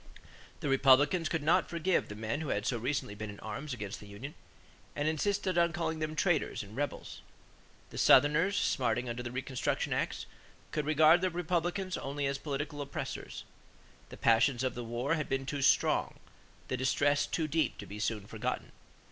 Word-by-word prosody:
The -, -, -2 dB
Republicans 145 Hz, +5 st, +4 dB
could 165 Hz, -3 st, -1 dB
not 155 Hz, -, +3 dB
forgive 170 Hz, +2 st, +1 dB
the 105 Hz, -, -6 dB
men 110 Hz, +7 st, -3 dB
who 160 Hz, -, -4 dB
had 105 Hz, +1 st, -1 dB
so 120 Hz, -, 0 dB
recently 130 Hz, -2 st, -2 dB
been 110 Hz, +1 st, -6 dB
in 100 Hz, -, -9 dB
arms 110 Hz, +8 st, -5 dB
against 105 Hz, -5 st, -5 dB
the 105 Hz, -, -12 dB
union 110 Hz, +9 st, -8 dB, 0.6 s
and 145 Hz, +1 st, -1 dB
insisted 185 Hz, +3 st, 0 dB
on 170 Hz, -1 st, +3 dB
calling 160 Hz, -2 st, -2 dB
them 155 Hz, 0 st, -3 dB
"traitors" 160 Hz, -, +1 dB
and 105 Hz, +2 st, -12 dB
"rebels." 145 Hz, +2 st, -4 dB, 0.7 s
The -, -, -6 dB
Southerners, 150 Hz, +9 st, +5 dB
smarting 125 Hz, -1 st, +1 dB
under 120 Hz, +1 st, -3 dB
the 120 Hz, -1 st, -5 dB
reconstruction 130 Hz, 0 st, -2 dB
acts, -, -, -2 dB, 0.5 s
could 150 Hz, -1 st, -2 dB
regard 155 Hz, +3 st, +6 dB
the 185 Hz, -, +2 dB
Republicans 180 Hz, +2 st, -1 dB
only 140 Hz, +1 st, -3 dB
as 140 Hz, 0 st, -1 dB
political 145 Hz, 0 st, -4 dB
oppressors. 140 Hz, 0 st, -5 dB, 0.7 s
The -, -, -10 dB
passions 120 Hz, +2 st, +3 dB
of 130 Hz, -, 0 dB
the 120 Hz, -, -5 dB
war 120 Hz, +6 st, -1 dB
had 155 Hz, -3 st, -2 dB
been 135 Hz, 0 st, -1 dB
too 145 Hz, +1 st, -3 dB
strong; -, -, +3 dB, 0.5 s
the -, -, -1 dB
distress 145 Hz, +3 st, +2 dB
too 160 Hz, -2 st, -1 dB
deep 155 Hz, +1 st, 0 dB
to 105 Hz, -, -8 dB
be 100 Hz, +1 st, -8 dB
soon 105 Hz, -1 st, -2 dB
forgotten. -, -, -4 dB
145 Hz, 180 wpm, -31 LUFS, 120-160 Hz, 0.7 s, regard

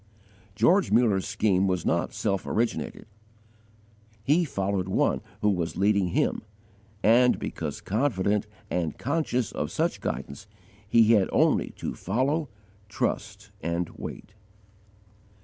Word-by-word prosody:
George 170 Hz, -, +3 dB
Muller's 105 Hz, -5 st, +3 dB
scheme 100 Hz, -2 st, +2 dB
was 90 Hz, -2 st, -1 dB
not 85 Hz, -, 0 dB
self 100 Hz, -3 st, -2 dB
originated. 115 Hz, +1 st, -2 dB, 1.2 s
He 160 Hz, +8 st, +3 dB
followed 100 Hz, -, -2 dB
One 95 Hz, -, +1 dB, 0.2 s
who 105 Hz, -, +3 dB
was 85 Hz, -3 st, -2 dB
leading 100 Hz, -1 st, +3 dB
him; 85 Hz, -, 0 dB, 0.6 s
and, 120 Hz, +3 st, +5 dB
because -, -, -5 dB
confident 105 Hz, -3 st, 0 dB, 0.2 s
and 85 Hz, -4 st, -1 dB
conscious 130 Hz, -5 st, -1 dB
of -, -, -3 dB
such -, -, -1 dB
guidance, 70 Hz, +9 st, -5 dB, 0.4 s
he 115 Hz, 0 st, +5 dB
had 100 Hz, -4 st, +3 dB
only -, -, +3 dB
to -, -, -4 dB
follow, 135 Hz, -, -1 dB, 0.4 s
trust, 105 Hz, -, -3 dB
and 85 Hz, +1 st, -2 dB
wait. 105 Hz, -, -9 dB
105 Hz, 115 wpm, -27 LUFS, 95-120 Hz, 1.2 s, and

